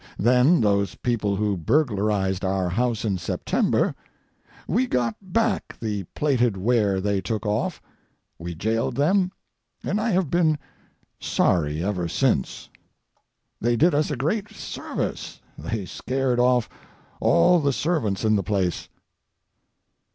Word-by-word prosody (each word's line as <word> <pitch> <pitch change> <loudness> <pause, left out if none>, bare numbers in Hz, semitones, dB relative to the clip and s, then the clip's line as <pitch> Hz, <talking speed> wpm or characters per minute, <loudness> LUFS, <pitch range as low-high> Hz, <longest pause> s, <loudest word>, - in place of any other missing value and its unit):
Then 125 - +4
those 100 -2 +1
people 105 -5 -1
who 105 0 0
burglarized 105 - 0
our 95 -1 0
house 115 +4 -1
in 95 -4 0
September—we 245 - -2
got 120 - 0
back 225 +4 -1
the 105 -4 -3
plated 125 -8 +1
ware 105 -2 +2
they 100 0 0
took 105 +2 -3
off, 105 0 -1 0.6
we 85 +1 -6
jailed 110 +6 -1
them, 180 +6 +2 0.5
and 210 +2 -1
I 225 - 0
have 185 -7 +1
been 160 -3 +3 0.6
sorry 75 -1 +1
ever 90 -3 -1
since. 110 - 0 0.9
They 120 +1 +1
did 170 +8 +4
us 150 +1 +1
a 150 - -1
great 195 - -1
service - - -5 0.2
they 110 -4 -4
scared 130 +5 -1
off 125 -1 +3 0.5
all 170 - +4
the 140 -2 +1
servants 125 - -1
in 110 0 +4
the 100 - +2
place. 95 -2 -1
115 Hz, 125 wpm, -24 LUFS, 100-145 Hz, 0.9 s, Then